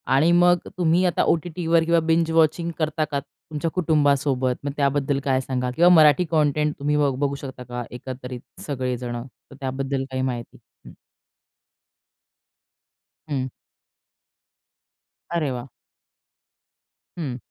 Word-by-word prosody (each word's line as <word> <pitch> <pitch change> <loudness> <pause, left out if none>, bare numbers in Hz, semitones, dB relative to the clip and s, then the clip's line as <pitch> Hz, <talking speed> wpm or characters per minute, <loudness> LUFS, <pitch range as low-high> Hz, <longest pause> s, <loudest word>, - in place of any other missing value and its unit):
आणि 155 +5 +4
मग 175 0 +5 0.2
तुम्ही 175 +1 +3
आता 175 - +2
ओ-टी-टीवर 165 0 +1
किंवा 170 0 +3
बिंज 165 0 +3
वॉचिंग 165 +1 +2
करता 155 0 0
का 140 - 0
तुमच्या 150 +3 -6
कुटुंबासोबत? 140 -6 +2
मग 145 - -2
त्याबद्दल 140 -1 +1
काय 130 -1 +1
सांगाल 125 -1 -2
किंवा 175 +2 +6
मराठी 155 +3 +6
कॉन्टेंट 150 -1 +2
तुम्ही 145 +1 +1
बघू 140 -3 +2
बघू 140 0 -1
शकता 130 -2 -8
का 125 0 -5
एकत्रित 125 0 -7 0.3
सगळे 130 -3 -2
जण? 120 -1 -5
तर 130 - -18
त्याबद्दल 135 +1 -2
काही 130 - -2
माहिती? 125 -3 -4 0.3
हं. - - -12 2.4
हं. 135 -3 -1 1.8
अरे 160 -5 0
वा! 125 -1 -5 1.5
हं. 135 -7 -4
145 Hz, 125 wpm, -23 LUFS, 130-160 Hz, 2.4 s, किंवा